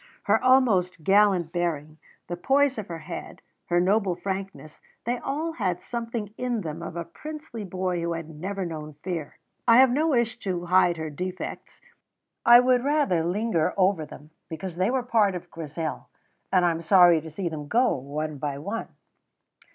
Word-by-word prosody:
Her -, -, +2 dB
almost 200 Hz, -10 st, +3 dB
gallant 195 Hz, -3 st, +4 dB
bearing, 160 Hz, -3 st, -2 dB, 0.3 s
the 175 Hz, -, -4 dB
poise 270 Hz, +6 st, +2 dB
of 210 Hz, -, -6 dB
her 170 Hz, -, -5 dB
head, 170 Hz, -, -8 dB, 0.2 s
her 175 Hz, 0 st, +2 dB
noble 190 Hz, 0 st, +2 dB
frankness 190 Hz, -4 st, -6 dB, 0.3 s
they 240 Hz, +1 st, -1 dB
all 310 Hz, +4 st, -2 dB
had 185 Hz, -, -2 dB
something 230 Hz, -2 st, -5 dB
in 245 Hz, -3 st, -1 dB
them 160 Hz, -1 st, -5 dB
of 170 Hz, 0 st, -7 dB
a 170 Hz, -1 st, -4 dB
princely 300 Hz, -, -8 dB
boy 185 Hz, -2 st, -2 dB
who 170 Hz, 0 st, -1 dB
had 165 Hz, -1 st, -5 dB
never 185 Hz, +5 st, -4 dB
known 155 Hz, -3 st, -6 dB
fear. 170 Hz, -6 st, -4 dB, 0.3 s
I 230 Hz, 0 st, +7 dB
have 260 Hz, -1 st, +7 dB
no 300 Hz, +6 st, +2 dB
wish 235 Hz, -5 st, +1 dB
to 180 Hz, -3 st, -3 dB
hide 175 Hz, -1 st, +4 dB
her 160 Hz, -1 st, -4 dB
defects; 180 Hz, +5 st, -6 dB, 0.7 s
I 240 Hz, +1 st, +10 dB
would 250 Hz, -1 st, +3 dB
rather 280 Hz, -, +2 dB
linger 180 Hz, -1 st, 0 dB
over 185 Hz, -3 st, +3 dB
them, 150 Hz, +2 st, -13 dB, 0.2 s
because 170 Hz, +2 st, -6 dB
they 185 Hz, +3 st, +2 dB
were 255 Hz, 0 st, 0 dB
part 220 Hz, -6 st, +2 dB
of 175 Hz, 0 st, -8 dB
Grizel, 160 Hz, 0 st, -5 dB, 0.4 s
and 185 Hz, -2 st, +4 dB
I 175 Hz, -, +4 dB
am 165 Hz, 0 st, -4 dB
sorry 175 Hz, -1 st, +6 dB
to 160 Hz, -, -9 dB
see 175 Hz, +4 st, -4 dB
them 155 Hz, -3 st, -5 dB
go 245 Hz, -, +3 dB
one 145 Hz, +2 st, -5 dB
by 140 Hz, -1 st, -3 dB
one. 200 Hz, +10 st, -4 dB
185 Hz, 175 wpm, -26 LUFS, 165-230 Hz, 0.7 s, I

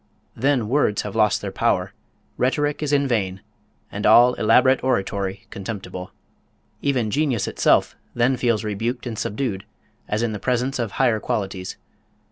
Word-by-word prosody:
Then 130 Hz, -2 st, +1 dB
words 125 Hz, -4 st, +1 dB
have 105 Hz, 0 st, -6 dB
lost 105 Hz, -2 st, +3 dB
their -, -, -3 dB
power, -, -, 0 dB, 0.4 s
rhetoric 145 Hz, +4 st, 0 dB
is 150 Hz, -2 st, -1 dB
in 140 Hz, -1 st, +2 dB
vain, 95 Hz, -6 st, -1 dB, 0.5 s
and 105 Hz, -, -5 dB
all 120 Hz, +3 st, +7 dB
elaborate 125 Hz, +4 st, +3 dB
oratory 100 Hz, -5 st, -1 dB
contemptible. 95 Hz, -2 st, -6 dB, 0.7 s
Even 125 Hz, -6 st, 0 dB
genius 140 Hz, -6 st, 0 dB
itself -, -, +2 dB, 0.2 s
then 120 Hz, +2 st, +2 dB
feels 120 Hz, -3 st, 0 dB
rebuked 115 Hz, +5 st, -3 dB
and 120 Hz, -3 st, -4 dB
subdued, 105 Hz, -2 st, -3 dB, 0.4 s
as 105 Hz, +2 st, -1 dB
in 115 Hz, -, 0 dB
the 105 Hz, -, -5 dB
presence 125 Hz, +3 st, -1 dB
of 115 Hz, -4 st, -2 dB
higher 120 Hz, -5 st, +2 dB
qualities. 95 Hz, -6 st, -3 dB
115 Hz, 145 wpm, -22 LUFS, 105-130 Hz, 0.7 s, all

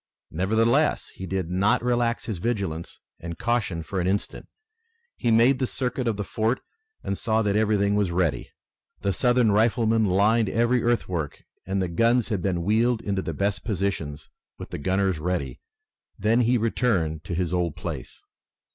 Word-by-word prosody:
Nevertheless, 115 Hz, -, +2 dB
he 95 Hz, -, -8 dB
did 95 Hz, -2 st, -2 dB
not 100 Hz, +5 st, +2 dB
relax 120 Hz, -1 st, 0 dB
his 105 Hz, -7 st, -4 dB
vigilance 95 Hz, -7 st, -3 dB, 0.2 s
and 85 Hz, 0 st, -7 dB
caution 110 Hz, -8 st, -1 dB
for 95 Hz, +3 st, -3 dB
an 90 Hz, -, -1 dB
instant. 100 Hz, +2 st, -2 dB, 0.7 s
He -, -, -1 dB
made 115 Hz, +4 st, +4 dB
the 130 Hz, -, 0 dB
circuit 125 Hz, -1 st, -2 dB
of 110 Hz, -3 st, 0 dB
the 105 Hz, -, -2 dB
fort 110 Hz, +5 st, -1 dB, 0.4 s
and 100 Hz, -, -2 dB
saw 110 Hz, +2 st, 0 dB
that 100 Hz, -1 st, +1 dB
everything 105 Hz, -2 st, +2 dB
was 105 Hz, -3 st, +1 dB
ready. 85 Hz, -3 st, 0 dB, 0.5 s
The 100 Hz, -, 0 dB
Southern 120 Hz, -2 st, +3 dB
riflemen 110 Hz, +1 st, +3 dB
lined 105 Hz, +3 st, +3 dB
every 120 Hz, +3 st, +2 dB
earthwork, 95 Hz, -11 st, -1 dB, 0.2 s
and 95 Hz, +1 st, -1 dB
the -, -, -1 dB
guns 115 Hz, +7 st, +2 dB
had 105 Hz, -5 st, -1 dB
been 90 Hz, -2 st, -1 dB
wheeled 115 Hz, +4 st, +2 dB
into 100 Hz, -1 st, -1 dB
the -, -, -4 dB
best 100 Hz, +1 st, -1 dB
positions, 90 Hz, -8 st, -3 dB, 0.3 s
with -, -, -9 dB
the -, -, -4 dB
gunners 95 Hz, +2 st, 0 dB
ready. 90 Hz, +2 st, -2 dB, 0.6 s
Then 110 Hz, +3 st, +2 dB
he 120 Hz, +1 st, +3 dB
returned 100 Hz, -9 st, 0 dB
to 85 Hz, -, -3 dB
his 90 Hz, -1 st, -1 dB
old 85 Hz, -4 st, 0 dB
place. -, -, -7 dB
105 Hz, 165 wpm, -25 LUFS, 90-115 Hz, 0.7 s, made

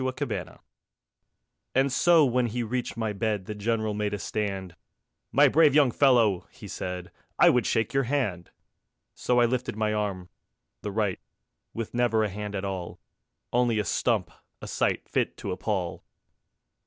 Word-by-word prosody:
_ -, -, -1 dB
Grand 130 Hz, 0 st, -2 dB
père -, -, -17 dB, 1.2 s
And 135 Hz, +1 st, +3 dB
so 170 Hz, -1 st, +5 dB
when 125 Hz, -1 st, +1 dB
he 120 Hz, +2 st, -2 dB
reached 120 Hz, +2 st, -3 dB
my 110 Hz, -2 st, -1 dB
bed 105 Hz, -1 st, -1 dB
The 105 Hz, -, -5 dB
General 110 Hz, 0 st, -1 dB
made 105 Hz, 0 st, -1 dB
a -, -, -4 dB
stand: 95 Hz, -2 st, -3 dB, 0.6 s
"My 145 Hz, +3 st, +6 dB
brave 150 Hz, 0 st, +5 dB
young 145 Hz, -4 st, +5 dB
fellow," 115 Hz, -9 st, +3 dB
he 125 Hz, -5 st, -12 dB
said, 90 Hz, -1 st, -5 dB, 0.3 s
"I -, -, +7 dB
would 125 Hz, -4 st, +1 dB
shake 110 Hz, +1 st, 0 dB
your 135 Hz, -1 st, +2 dB
hand." 115 Hz, -, -1 dB, 0.6 s
So 125 Hz, 0 st, +1 dB
I 120 Hz, -, +5 dB
lifted 125 Hz, -1 st, -1 dB
my 110 Hz, 0 st, 0 dB
arm, 100 Hz, -4 st, -3 dB, 0.5 s
the 105 Hz, -, -4 dB
right, 100 Hz, -2 st, -1 dB, 0.6 s
With 115 Hz, -1 st, -4 dB
never 120 Hz, -2 st, +2 dB
a 105 Hz, -, 0 dB
hand 105 Hz, +1 st, -5 dB
at 100 Hz, 0 st, -3 dB
all; 95 Hz, -3 st, -5 dB, 0.5 s
Only 120 Hz, -2 st, +2 dB
a 105 Hz, -, 0 dB
stump, 80 Hz, -, 0 dB, 0.3 s
a -, -, -8 dB
sight -, -, -1 dB
Fit -, -, -1 dB
to -, -, -5 dB
appal. 90 Hz, -2 st, -3 dB
110 Hz, 165 wpm, -27 LUFS, 100-125 Hz, 1.2 s, I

